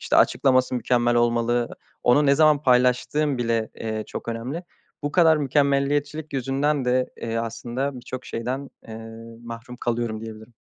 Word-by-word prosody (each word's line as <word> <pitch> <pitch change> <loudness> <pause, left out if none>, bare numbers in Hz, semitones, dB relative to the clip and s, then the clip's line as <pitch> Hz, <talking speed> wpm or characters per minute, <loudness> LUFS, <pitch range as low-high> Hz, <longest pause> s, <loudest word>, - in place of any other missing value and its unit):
işte, - - +1
açıklaması 130 -1 +3
mükemmel 120 0 +1
olmalı. 120 0 +2 0.3
Onu 145 +5 +4
ne 140 - +5
zaman 150 -1 +4
paylaştığım 125 +3 +2
bile, 115 -2 0
eee, 110 -1 -4
çok - - -7
önemli. 125 +9 -4 0.4
Bu 145 0 -2
kadar 165 -3 +5
mükemmeliyetçilik 145 +1 0
yüzünden 135 +2 0
de, 125 +1 +1
eee, 115 0 -3
aslında 120 +4 -3
birçok 125 0 -7
şeyden, 130 +4 -4 0.2
eee, 110 - -7 0.5
mahrum 115 +1 -8
kalıyorum 120 -2 -2
diyebilirim. 110 +1 -10
125 Hz, 140 wpm, -24 LUFS, 115-140 Hz, 0.5 s, ne